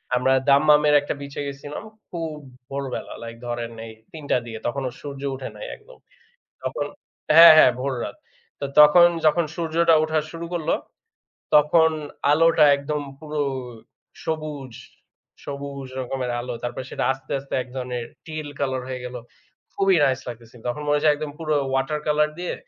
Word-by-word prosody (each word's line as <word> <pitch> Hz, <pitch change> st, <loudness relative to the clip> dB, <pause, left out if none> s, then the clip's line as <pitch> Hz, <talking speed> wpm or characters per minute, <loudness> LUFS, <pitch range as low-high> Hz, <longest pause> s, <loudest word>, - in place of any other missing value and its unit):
আমরা 130 Hz, +2 st, +3 dB, 0.2 s
দাম্মামের 150 Hz, +1 st, +5 dB
একটা 145 Hz, -, -3 dB
বিচে 140 Hz, 0 st, -8 dB
গেছিলাম। 140 Hz, +5 st, -7 dB, 0.3 s
খুব 165 Hz, -3 st, -4 dB, 0.3 s
ভোরবেলা 135 Hz, -2 st, -5 dB
লাইক 115 Hz, 0 st, -7 dB
ধরেন 120 Hz, -1 st, -4 dB
এই 110 Hz, -, -9 dB, 0.2 s
৩ 155 Hz, -2 st, -10 dB
টা -, -, +5 dB
দিকে। 115 Hz, -2 st, -7 dB
তখনও 130 Hz, +1 st, -2 dB
সূর্য 140 Hz, -2 st, -7 dB
উঠে 130 Hz, -, -6 dB
নাই -, -, -8 dB
একদম। -, -, -18 dB, 0.7 s
তখন -, -, -2 dB, 0.5 s
হ্যাঁ, 170 Hz, -1 st, +12 dB
হ্যাঁ, 125 Hz, -, +8 dB
ভোর 135 Hz, +1 st, -1 dB
রাত। -, -, -6 dB, 0.4 s
তো 140 Hz, -, -3 dB
তখন 170 Hz, +4 st, +9 dB, 0.2 s
যখন 155 Hz, +2 st, +4 dB
সূর্যটা 165 Hz, 0 st, +3 dB
উঠা 155 Hz, 0 st, +1 dB
শুরু 170 Hz, 0 st, -6 dB
করল 165 Hz, -3 st, -2 dB, 0.9 s
তখন 160 Hz, +2 st, +5 dB, 0.4 s
আলোটা 165 Hz, 0 st, +5 dB
একদম 145 Hz, +1 st, -3 dB, 0.2 s
পুরো 150 Hz, -1 st, -3 dB, 0.8 s
সবুজ 150 Hz, -5 st, -4 dB, 0.7 s
সবুজ 140 Hz, -1 st, -6 dB
রকমের 130 Hz, -1 st, -3 dB
আলো। 125 Hz, 0 st, -5 dB
তারপরে 120 Hz, +1 st, -4 dB
সেটা -, -, -2 dB
আস্তে, 135 Hz, 0 st, -9 dB
আস্তে 140 Hz, -, -7 dB
এক -, -, -15 dB
ধরনের 125 Hz, -2 st, -3 dB, 0.2 s
teal 155 Hz, -2 st, -5 dB
কলার 130 Hz, -2 st, -1 dB
হয়ে 130 Hz, -1 st, -5 dB
গেল। 125 Hz, 0 st, -6 dB, 0.6 s
খুবই 195 Hz, -2 st, +3 dB
nice 130 Hz, -1 st, +1 dB
লাগতেছিল। 120 Hz, 0 st, -10 dB
তখন 150 Hz, +5 st, -3 dB
মনে 145 Hz, 0 st, +3 dB
হয় 145 Hz, -, -1 dB
যে -, -, +6 dB
একদম 150 Hz, 0 st, -5 dB
পুরো 155 Hz, -2 st, -1 dB, 0.2 s
water 135 Hz, +3 st, 0 dB
colour 150 Hz, 0 st, +3 dB
দিয়ে 180 Hz, -, -3 dB
145 Hz, 160 wpm, -23 LUFS, 130-155 Hz, 0.9 s, হ্যাঁ